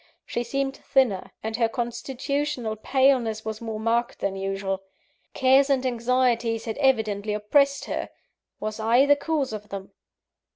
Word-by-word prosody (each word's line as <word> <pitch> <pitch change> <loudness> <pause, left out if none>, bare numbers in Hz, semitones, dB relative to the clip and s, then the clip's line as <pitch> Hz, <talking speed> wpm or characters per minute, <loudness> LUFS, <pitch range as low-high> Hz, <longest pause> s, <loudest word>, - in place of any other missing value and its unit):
She 240 - -2
seemed 270 +2 -2
thinner, 240 -9 +1
and 220 0 -3
her 230 -2 +2
constitutional 245 +1 -2
paleness 240 -2 +2
was 220 0 -4
more 220 -2 -4
marked 230 +2 0
than 195 -1 -2
usual. 195 0 -2 0.5
Cares 270 +1 +5
and 265 -2 +2
anxieties 235 -2 +1
had 225 +3 -4
evidently 215 -6 +1
oppressed 280 +7 +2
her - - -3 0.5
was 215 +1 -4
I 235 +5 +4
the 285 0 +6
cause 285 -4 -1
of 210 0 -7
them? 195 -1 -7
235 Hz, 140 wpm, -25 LUFS, 215-265 Hz, 0.5 s, the